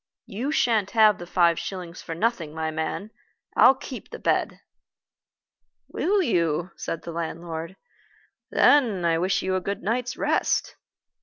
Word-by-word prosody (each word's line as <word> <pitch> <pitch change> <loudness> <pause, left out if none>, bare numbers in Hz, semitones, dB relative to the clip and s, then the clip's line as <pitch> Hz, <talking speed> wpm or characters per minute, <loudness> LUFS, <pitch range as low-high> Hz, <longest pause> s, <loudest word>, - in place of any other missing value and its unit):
You 240 +9 -3
shan't 225 -9 +2
have 215 -3 +6
the 175 - -8
five 170 -1 +3
shillings 180 -2 -6
for 165 - -6
nothing, 170 -6 -1
my 160 0 -2
man. 160 +7 -4 0.4
I'll 265 - +7
keep 260 0 -9
the - - -7
bed." - - 0 1.3
"Will 395 +2 +1
you?" 170 - 0
said 165 - -5
the 170 - -6
landlord. 165 +1 -5 0.7
"Then 225 -11 +4
I 165 -1 +2
wish 190 +2 0
you 185 0 0
a 185 - 0
good 200 +1 -4
night's 240 +4 -1
rest." - - 0
185 Hz, 145 wpm, -25 LUFS, 170-220 Hz, 1.3 s, I'll